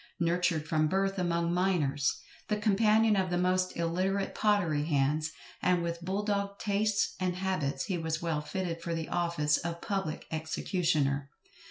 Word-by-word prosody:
Nurtured 170 -2 +1
from 155 -1 +2
birth 195 +3 0
among 170 -1 +1
miners, 170 -7 +1 0.3
the 210 - 0
companion 215 +1 +4
of 190 -2 +1
the 175 - 0
most 185 +1 +1
illiterate 185 +4 0
pottery 175 -9 +2
hands, 150 +1 +1 0.3
and 180 -1 +2
with 170 0 -3
bull 190 +3 -1
dog 200 -1 -1
tastes 205 0 +1
and 180 -1 0
habits, 180 -8 -1
he 185 -3 -2
was 160 -1 -2
well 165 -3 -1
fitted 170 +1 -3
for 170 0 -2
the 160 -1 -4
office 170 -4 +1
of 170 0 -4
public 190 -6 -3
executioner. 155 -3 0
175 Hz, 155 wpm, -30 LUFS, 160-195 Hz, 0.3 s, companion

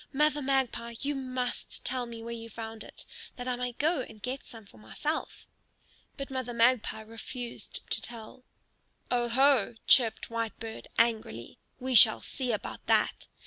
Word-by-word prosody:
"Mother 300 +1 +2
Magpie, 260 -3 0
you 290 +1 0
must 255 -2 -4
tell 250 -1 -1
me 230 -1 -8
where 235 0 -5
you 230 0 -7
found 225 0 -7
it, - - -9 0.3
that 245 0 -6
I 250 - 0
may 245 0 -3
go 305 +3 +1
and 220 -3 -9
get 255 +5 -4
some 225 -3 -11
for 110 - -18
myself." 205 - -4 0.7
But 275 -1 -6
Mother 255 -2 -3
Magpie 230 -2 +3
refused 230 +2 -6
to - - +3
tell. 235 +1 -8 0.7
"Oho!" 245 -1 +3
chirped 235 -2 +5
Whitebird, 230 -1 -4
angrily; 220 - 0 0.2
"we 260 +1 -2
shall 220 -1 +9
see 255 -3 -2
about 210 - -4
that! - - +2
240 Hz, 150 wpm, -30 LUFS, 225-260 Hz, 0.7 s, shall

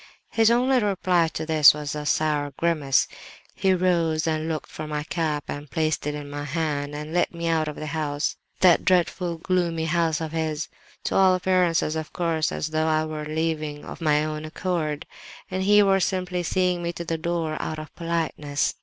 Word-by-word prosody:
"His 225 -1 +4
only 250 +2 +3
reply 185 -5 +2
to - - -3
this 155 -2 +7
was 150 -1 -4
a 150 -1 -4
sour 150 -3 0
grimace. 155 -6 +2 0.5
He 190 - +1
rose 170 -3 +1
and 160 0 -1
looked 155 -2 -4
for 155 - -6
my 150 -1 -3
cap, 155 -2 -2
and 145 0 -6
placed 155 0 -1
it 150 - -2
in 145 -1 -6
my 145 0 -5
hand, 145 -1 -2
and 150 +2 -6
led 175 - +2
me 170 -1 -4
out 160 -2 +1
of 150 - -4
the 155 - -6
house—that 155 +4 +1
dreadful 180 -1 +1
gloomy 170 -2 0
house 165 -1 +1
of 160 -2 -4
his—to 160 -1 -4
all 190 -1 +5
appearances, 180 -4 +2
of 160 -1 -4
course, 165 -2 0
as 155 - -3
though 155 0 0
I 155 0 +2
were 155 -1 -5
leaving 155 -1 -2
of - - -9
my 150 -1 +3
own 155 0 -4
accord, 155 -2 -2 0.5
and 185 +1 -1
he 205 +2 +6
were 195 -1 +4
simply 180 -1 -1
seeing 180 0 +1
me 170 0 -2
to 170 - -6
the 165 -1 -2
door 165 -2 -2
out 155 - -3
of 155 0 -8
politeness. 160 -4 -1
160 Hz, 190 wpm, -25 LUFS, 150-175 Hz, 0.5 s, this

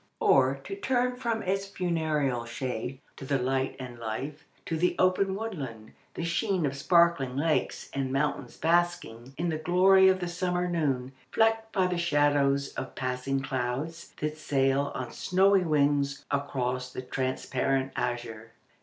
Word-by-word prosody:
Or, - - +4
to 390 - -5
turn 250 -10 0
from 235 -3 -2
its 195 +1 -1
funereal 155 -9 -1
shade 125 +1 -4 0.2
to - - -9
the 135 +1 +1
light 130 +1 -1
and 125 -2 -8
life, 130 +7 -5 0.2
to 165 - -2
the 175 +3 +1
open 190 +1 +2
woodland, 140 - -6 0.2
the - - -3
sheen 180 0 0
of 140 -1 -1
sparkling 160 -3 +3
lakes, 155 +2 0
and 135 -1 -2
mountains 135 -2 -1
basking 165 -8 0
in 170 +1 -1
the 155 -1 -2
glory 190 +3 +5
of 190 0 +4
the 175 - -3
summer 180 0 -1
noon, 140 -7 -1 0.2
flecked 225 0 +2
by 190 -3 +2
the 180 -1 -1
shadows 145 -4 +2
of 130 - -6
passing 130 +1 -2
clouds 135 +5 -3
that 150 +1 -3
sail 135 -1 +1
on 130 - -4
snowy 195 +1 +3
wings 145 -3 +1
across 125 -3 -2
the 130 - -6
transparent 130 +1 -1
azure." 120 -2 -4
145 Hz, 150 wpm, -28 LUFS, 130-180 Hz, 0.2 s, glory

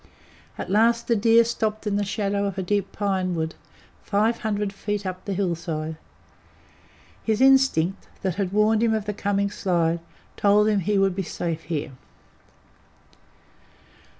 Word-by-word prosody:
At - - -5
last 230 +3 +3
the 235 - +3
deer 225 +2 +5
stopped 220 -2 -2
in 205 -1 0
the 205 - +1
shadow 200 0 -1
of 195 - -5
a 190 - -1
deep 200 +1 -1
pinewood, 185 -5 -1 0.5
five 215 +3 +1
hundred 210 -2 -2
feet 205 0 -3
up 185 0 -5
the 200 - -2
hillside. 165 -4 -2 1.3
His 220 -1 0
instinct, 265 -10 +3 0.2
that 190 -2 0
had 190 0 -2
warned 215 +2 +3
him 225 -1 +3
of 215 -2 -2
the 210 - -2
coming 200 0 -1
slide, 170 -4 0 0.4
told 205 +1 +4
him 210 -2 +2
he 200 +3 0
would 195 -2 +2
he 195 - -1
safe 165 -2 -4
here. 155 -3 -3
200 Hz, 150 wpm, -24 LUFS, 185-215 Hz, 1.3 s, deer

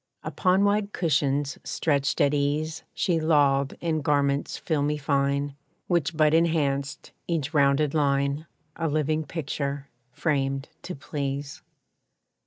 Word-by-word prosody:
Upon 185 +1 +2
wide 205 0 +1
cushions 140 -3 0
stretched 140 -3 0
at 140 - +3
ease 150 +2 -1
She 175 -5 +1
lolled 140 -3 +2
in 160 -2 0
garments 140 -1 +1
filmy 150 -2 0
fine, 140 0 0 0.3
Which 170 -3 0
but 155 -1 +4
enhanced 145 -4 0 0.2
each 160 -3 -2
rounded 140 0 +3
line; 140 0 +1 0.3
A 165 - -1
living 155 +1 0
picture, 140 -2 -4 0.2
framed 135 0 -1
to 180 - -6
please. 140 +1 -4
145 Hz, 115 wpm, -26 LUFS, 140-160 Hz, 0.3 s, but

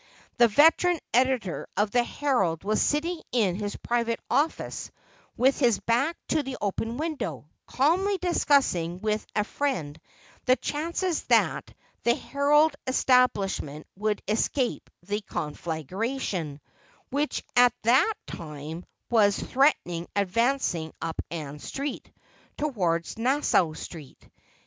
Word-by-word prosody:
The 240 - +7
veteran 325 - +4
editor 250 -6 +1
of 205 0 +2
the 245 +1 +3
Herald 235 - 0
was 215 +2 +1
sitting 325 +3 0
in 215 -7 +2
his 205 +1 -4
private 235 -1 -1
office 300 +3 0 0.5
with 265 +3 +3
his 240 -6 +3
back 270 +9 +1
to 310 - +2
the 265 -2 -6
open 225 +3 -2
window, 235 - -4 0.2
calmly 370 +9 +2
discussing 275 - +1
with 215 +1 -1
a 210 - +2
friend 170 - -3 0.4
the 255 -1 +5
chances 330 +6 -2
that - - +2 0.3
the 235 0 +3
Herald 290 +2 +3
establishment 205 - +2
would 210 +1 -1
escape 240 +4 0
the 205 +1 -2
conflagration, 165 - -4 0.5
which 290 +3 -1
at 245 -1 +6
that 265 - +4
time 155 +1 -7 0.3
was 205 -4 +4
threateningly 175 - +1
advancing 200 - 0
up 165 -1 -3
Ann 150 -3 -6
Street, 275 - -5 0.5
toward 180 - 0
Nassau 245 - +2
Street. 155 -3 -10
235 Hz, 115 wpm, -27 LUFS, 180-280 Hz, 0.5 s, The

